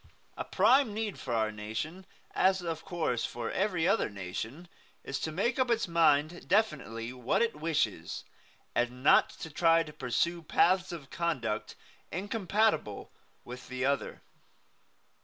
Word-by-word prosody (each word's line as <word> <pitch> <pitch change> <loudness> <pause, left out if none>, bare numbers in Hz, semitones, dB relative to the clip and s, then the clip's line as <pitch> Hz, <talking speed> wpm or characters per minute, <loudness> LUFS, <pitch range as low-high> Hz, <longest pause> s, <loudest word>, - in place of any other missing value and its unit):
A - - -3
prime 225 +3 +3
need 215 -3 -3
for 130 - -5
our 110 -1 +1
nation, 110 - -5 0.3
as 190 -1 +3
of 165 -2 -4
course 165 -10 -1
for 120 -1 -3
every 185 -4 +1
other 195 - +2
nation, 105 - -6 0.4
is 135 -1 -3
to 160 - -3
make 220 +10 0
up 255 -1 +2
its 230 -3 +1
mind 165 -1 +2
definitely 130 - 0
what 125 - +1
it 230 - -1
wishes, 150 - -1 0.5
and 125 +1 -1
not - - +6
to 160 - -9
try 165 +1 +4
to 150 -2 -11
pursue 170 +8 -1
paths 185 +4 +2
of 150 -6 -8
conduct 130 -11 -2 0.4
incompatible 200 - 0
one - - -10 0.4
with 125 +1 -9
the 130 0 -2
other. 140 0 -1
160 Hz, 145 wpm, -30 LUFS, 125-190 Hz, 0.5 s, not